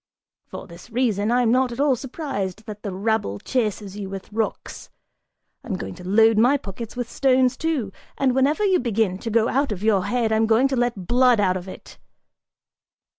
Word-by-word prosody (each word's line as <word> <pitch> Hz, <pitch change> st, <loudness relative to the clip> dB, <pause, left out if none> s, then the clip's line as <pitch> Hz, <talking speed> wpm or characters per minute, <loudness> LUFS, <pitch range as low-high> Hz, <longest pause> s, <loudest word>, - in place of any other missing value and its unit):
For -, -, -8 dB
this 170 Hz, +5 st, -14 dB
reason, 225 Hz, -3 st, 0 dB
I'm 245 Hz, -2 st, +3 dB
not 255 Hz, 0 st, +2 dB
at 235 Hz, -, -7 dB
all 285 Hz, -2 st, +3 dB
surprised 225 Hz, -, -5 dB
that 210 Hz, -1 st, -8 dB
the 200 Hz, -, -5 dB
rabble 200 Hz, -, -1 dB
chases 210 Hz, -, -2 dB
you 195 Hz, -2 st, -5 dB
with 195 Hz, +1 st, -8 dB
rocks. 225 Hz, 0 st, -4 dB, 0.7 s
I'm 210 Hz, -, -4 dB
going -, -, -6 dB
to 180 Hz, -, -12 dB
load 220 Hz, +2 st, +4 dB
my 250 Hz, +5 st, +4 dB
pockets 225 Hz, 0 st, -8 dB
with 245 Hz, -1 st, -3 dB
stones, 255 Hz, 0 st, +2 dB
too, 280 Hz, -10 st, -2 dB, 0.3 s
and 265 Hz, -2 st, +2 dB
whenever 285 Hz, +10 st, +2 dB
you 380 Hz, -2 st, +3 dB
begin 220 Hz, -6 st, 0 dB
to 230 Hz, -, -5 dB
go 225 Hz, +1 st, +2 dB
out 275 Hz, 0 st, 0 dB
of 200 Hz, -1 st, -5 dB
your 205 Hz, -4 st, +2 dB
head, 230 Hz, +1 st, 0 dB
I'm 220 Hz, 0 st, +2 dB
going 230 Hz, +4 st, +4 dB
to 265 Hz, -, -1 dB
let 240 Hz, -6 st, -1 dB
blood 245 Hz, +1 st, +4 dB
out 185 Hz, -2 st, +2 dB
of 185 Hz, 0 st, -6 dB
it!" 185 Hz, -, -11 dB
225 Hz, 190 wpm, -23 LUFS, 200-255 Hz, 0.7 s, load